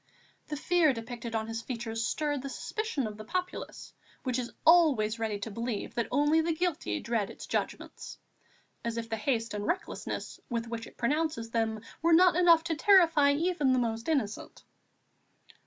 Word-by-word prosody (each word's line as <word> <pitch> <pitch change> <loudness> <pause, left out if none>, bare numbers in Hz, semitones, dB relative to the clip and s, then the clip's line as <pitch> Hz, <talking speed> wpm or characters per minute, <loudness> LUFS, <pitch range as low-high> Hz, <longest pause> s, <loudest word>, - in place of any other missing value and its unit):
The 300 - -4
fear 330 -1 +3
depicted 230 0 -6
on 220 0 -1
his 225 +1 -4
features 230 -1 -3
stirred 295 -3 -1
the 275 - -5
suspicion 430 - -3
of 210 -1 -6
the 215 - -8
populace, 360 - -5 0.3
which 255 -1 -1
is 240 -1 -4
always 280 -10 +5
ready 220 -2 -1
to 220 - -4
believe 230 0 -4
that 235 - -1
only 295 +4 +3
the 325 0 0
guilty 315 - -1
dread 225 -4 -1
its - - -9
judgments, - - -4 0.7
as 235 0 -3
if 230 0 -4
the 225 - -1
haste 225 0 -1
and 205 0 -3
recklessness 365 +1 -3
with 235 -2 -2
which 230 -1 -5
it - - -16
pronounces 275 -3 -1
them 225 -2 -1 0.2
were 335 0 +4
not 360 +1 +6
enough 340 -2 +6
to 335 -1 -1
terrify 330 -5 +5
even 300 -3 +1
the - - +3
most 230 +1 -1
innocent. 255 -10 -2
250 Hz, 170 wpm, -30 LUFS, 225-320 Hz, 0.7 s, not